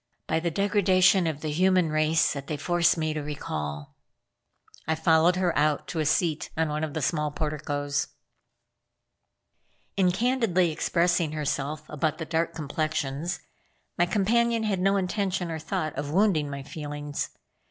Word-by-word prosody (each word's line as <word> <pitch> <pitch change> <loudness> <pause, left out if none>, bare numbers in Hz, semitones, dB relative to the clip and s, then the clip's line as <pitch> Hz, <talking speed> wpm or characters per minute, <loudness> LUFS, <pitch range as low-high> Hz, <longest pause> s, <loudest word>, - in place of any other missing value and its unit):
"By - - 0
the 170 +1 -1
degradation 190 -1 +3
of 155 -2 -3
the 155 - -2
human 180 0 +3
race 155 +1 +2
that 140 -1 -7
they 150 - -3
force 175 +2 +2
me 155 -1 -1
to 155 - -3
recall." 75 - -5 0.9
I 160 - +2
followed 160 +2 +4
her 180 -2 0
out 150 0 +1
to 160 - -3
a 155 - +1
seat 160 -1 +1
on 160 -1 +1
one 150 +1 -2
of 155 -1 -4
the 160 - -2
small 150 +2 0
porticoes. 145 -2 -2 1.9
In 190 -2 +3
candidly 205 -5 +2
expressing 170 0 +1
herself 150 0 -3
about 150 +1 -1
the 160 - -4
dark 165 +1 -1
complexions, 155 +1 -2 0.5
my 175 - +2
companion 230 +4 +2
had 205 -4 0
no 195 +2 +3
intention 190 -2 -1
or 160 - -3
thought 160 -1 -3
of 145 - -3
wounding 170 -4 +2
my 140 -1 -6
feelings. 145 0 -5
160 Hz, 155 wpm, -27 LUFS, 150-180 Hz, 1.9 s, followed